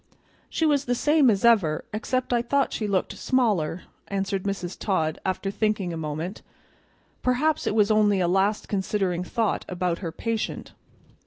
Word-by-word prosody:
"She 325 - 0
was 285 -3 +2
the 245 - 0
same 295 +1 +4
as 200 0 +2
ever, 195 -10 +3
except 250 +3 -1
I 240 - +3
thought 275 +3 0
she 215 - -2
looked 195 -2 -1
smaller," 200 - 0 0.2
answered 195 -1 -2
Mrs. 190 -3 -3
Todd 160 -6 -1
after 190 +1 -2
thinking 210 -4 -1
a - - -3
moment; 160 +4 -4 0.8
perhaps 290 +5 +1
it - - 0
was 210 -1 +4
only 210 -2 +4
a 175 - +2
last 195 +4 +1
considering 190 -3 -1
thought 225 +3 -1
about 180 -1 -1
her 170 -4 -4
patient. 225 +5 -3
200 Hz, 160 wpm, -25 LUFS, 180-235 Hz, 0.8 s, same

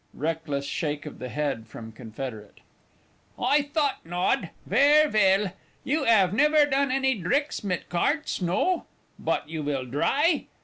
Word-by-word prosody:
(Reckless 150 -2 -3
shake 150 0 -3
of 150 - -9
the 125 - -6
head 140 -6 -3
from 115 0 -10
Confederate.) 110 -1 -8 0.8
I 280 +4 +3
thought 290 -1 -1
nod. 175 0 -1 0.2
Vair 290 +8 +5
vell. 200 -5 +3 0.3
You 295 -1 0
'ave 200 -4 +4
nevaire 300 +3 +5
done 280 -1 +1
any 265 0 +2
dricks 255 - -1
mit 185 -3 -3
carts 290 - -1
no? 190 - 0 0.3
Bot - - -1
you 160 0 -5
will 140 -3 -2
dry? 285 - +1
190 Hz, 140 wpm, -26 LUFS, -, 0.8 s, Vair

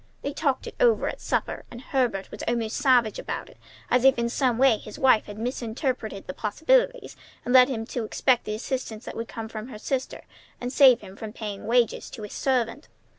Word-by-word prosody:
They 285 - -3
talked 275 -4 0
it - - -7
over 480 -2 +4
at - - -7
supper, - - -2
and 235 - -9
Herbert 245 -7 -1
was - - -8
almost 230 -2 -1
savage 250 -6 +3
about - - -5
it, - - -21 0.3
as 250 0 +4
if 265 -1 +6
in 235 0 0
some 250 -1 +1
way 255 -4 +4
his 210 - -10
wife 255 -5 +4
had 205 - -9
misrepresented 235 -2 -3
the 185 - -6
possibilities, - - +1 0.3
and 245 - 0
led 255 0 +8
him 225 -4 -3
to 240 0 -4
expect 245 +3 +1
the 210 - -3
assistance 235 -1 -4
that - - -7
would 230 0 -4
come 225 -1 -6
from 220 0 -7
her 245 -5 -9
sister 260 +4 -3 0.4
and 245 +1 -4
save 255 -4 +7
him 190 - -11
from 215 0 -7
paying 210 -3 -6
wages 235 -1 +1
to 220 - -9
a 210 - -6
servant. 255 +1 -1
240 Hz, 210 wpm, -26 LUFS, 220-265 Hz, 0.4 s, led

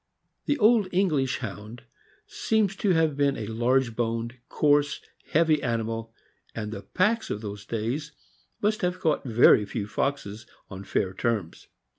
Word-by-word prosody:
The 290 - +2
old 220 -3 +4
English 155 -9 +1
Hound 110 +1 -7 0.4
seems 215 -3 0
to 205 - 0
have 160 -3 +2
been 140 -1 +1
a 110 - -4
large 120 +2 +1
boned, 115 0 -2 0.2
coarse, 145 -1 +2 0.3
heavy 155 -1 +3
animal; 115 -1 -2 0.4
and 105 -2 -4
the 100 - -6
packs 210 - 0
of 105 - -3
those 100 -1 -7
days 120 +7 -3 0.5
must 215 +1 +1
have 180 0 -1
caught 155 -5 +1
very 115 -3 +6
few 105 0 -4
foxes 110 -1 -3 0.2
on 95 +1 -8
fair 95 -1 -1
terms. 105 -5 -2
125 Hz, 145 wpm, -26 LUFS, 110-160 Hz, 0.5 s, very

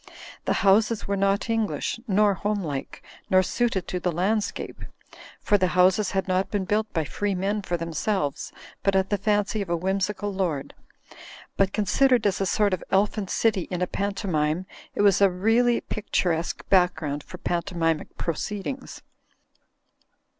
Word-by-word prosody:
The - - +2
houses 215 +3 +3
were 200 - 0
not 195 +2 +1
English, 225 0 -1
nor 205 0 +3
homelike, 185 -8 -3 0.3
nor 185 0 +5
suited 200 -3 -1
to 180 - -2
the 180 +1 0
land 200 +6 +1
scape; - - -6 0.6
for 205 - +2
the 185 - +3
houses 185 +3 +4
had 195 -1 -1
not 185 +1 +1
been 200 -3 -1
built 215 +3 0
by 160 - 0
free 200 +8 -2
men 200 +3 -1
for 175 -2 -2
themselves, 165 -2 -2 0.3
but 195 -1 +1
at 190 +1 +1
the 205 - +1
fancy 205 +1 +1
of 195 - -5
a 170 - +1
whimsical 195 +3 -1
lord. 170 -8 -2 0.8
But 195 -1 +2
considered 240 +4 +2
as 195 -1 +1
a 195 - +1
sort 205 0 +2
of 185 - -2
elfin 200 +1 +1
city 200 -3 +1
in 180 -1 -1
a - - +3
pantomime 185 -5 -1 0.3
it - - +1
was 200 -1 +4
a 200 - +7
really 225 +6 +2
picturesque 175 -6 -2
background 165 -6 +2
for - - -11
pantomim 170 -3 -1
ic - - -15
proceedings. 210 - -4
195 Hz, 160 wpm, -25 LUFS, 180-210 Hz, 0.8 s, a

